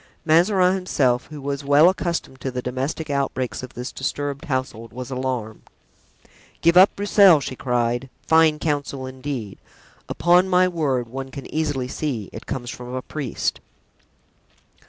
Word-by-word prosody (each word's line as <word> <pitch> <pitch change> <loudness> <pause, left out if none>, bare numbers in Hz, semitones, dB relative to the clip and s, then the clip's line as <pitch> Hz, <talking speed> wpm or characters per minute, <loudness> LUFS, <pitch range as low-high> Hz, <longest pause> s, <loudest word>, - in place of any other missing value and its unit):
Mazarin 180 +3 +4
himself, 135 -10 0
who 150 -1 -9
was 140 0 -4
well 145 +4 +6
accustomed 170 -7 -2
to 135 - -2
the 125 -1 -4
domestic 135 +5 -3
outbreaks 135 -2 -2
of 130 - -10
this 125 +1 -5
disturbed 140 +2 -3
household, 130 -5 -3
was 125 +1 -7
alarmed. 125 -4 -3 1.0
"Give 170 +1 +4
up 185 +2 +7
Broussel!" 200 -4 +6
she 130 -1 -5
cried; 120 0 -1 0.2
"fine 160 -1 +4
counsel, 145 -3 -2
indeed. 130 -5 -6 0.5
Upon 180 +2 +3
my 180 0 +4
word! 140 -9 -1
one 135 +3 -6
can 135 0 -8
easily 145 -5 -1
see 125 -7 -4
it - - -9
comes 120 -3 -4
from 125 +1 -7
a 130 - -4
priest." 145 -6 -3
140 Hz, 145 wpm, -22 LUFS, 125-160 Hz, 1.0 s, up